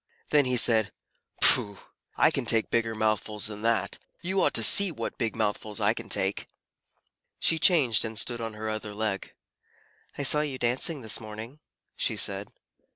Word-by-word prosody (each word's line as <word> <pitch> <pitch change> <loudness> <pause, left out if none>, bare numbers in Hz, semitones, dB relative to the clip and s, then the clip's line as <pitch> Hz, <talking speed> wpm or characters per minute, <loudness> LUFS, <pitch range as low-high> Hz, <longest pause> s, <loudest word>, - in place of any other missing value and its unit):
Then 145 -2 +4
he 125 -1 0
said, 110 -3 +4 0.5
"Pooh! 100 -1 +4 0.4
I - - +4
can - - -3
take 115 -1 +2
bigger 115 -1 0
mouthfuls 110 -1 -1
than 105 -1 -5
that. 110 -3 0 0.2
You 190 +2 0
ought - - +1
to - - +2
see 200 -2 +5
what - - -6
big 115 -2 -2
mouthfuls 105 0 -3
I 105 +1 +2
can 115 -2 -8
take." 95 +1 -1 0.9
She 165 - +1
changed, 150 - +4
and 110 -1 -5
stood 120 +1 0
on 115 -1 -5
her 110 +1 -6
other 110 -1 -5
leg. 105 -2 -3 0.8
"I 145 - -2
saw 150 +2 +4
you 145 -3 -4
dancing 130 +5 -1
this 110 -2 -2
morning," 110 +6 -9 0.4
she - - -2
said. - - -1
115 Hz, 170 wpm, -27 LUFS, 110-130 Hz, 0.9 s, see